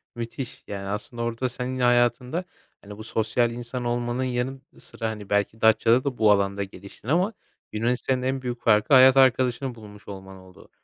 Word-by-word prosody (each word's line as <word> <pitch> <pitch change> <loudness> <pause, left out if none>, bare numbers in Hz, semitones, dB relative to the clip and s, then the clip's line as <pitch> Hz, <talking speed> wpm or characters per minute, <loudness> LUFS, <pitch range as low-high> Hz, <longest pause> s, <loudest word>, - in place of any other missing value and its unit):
Müthiş. 120 +2 -6
Yani, 100 -1 -6
aslında 105 +4 -5
orada 120 +2 -2
sen 125 +1 -5
hayatında, 120 +6 +2 0.4
hani, 100 0 -11
bu 110 - -8
sosyal 115 +2 0
insan 120 +1 -6
olmanın 120 +1 -1
yanı 130 +1 -2 0.2
sıra, 115 -1 -5
hani, 105 -2 -8
belki 105 +2 0
Datça'da 115 +3 +4
da 135 -3 -3
bu 110 -1 +5
alanda 100 0 +1
geliştin 100 +2 -13
ama 180 - +1 0.4
Yunanistan'ın 125 +3 -1
en 130 +1 -1
büyük 125 -1 -5
farkı, 110 +6 +3
hayat 130 0 +8
arkadaşını 130 0 +3
bulmuş 105 -2 -14
olman 95 -1 -9
oldu. 95 -1 -17
120 Hz, 165 wpm, -25 LUFS, 105-130 Hz, 0.4 s, hayat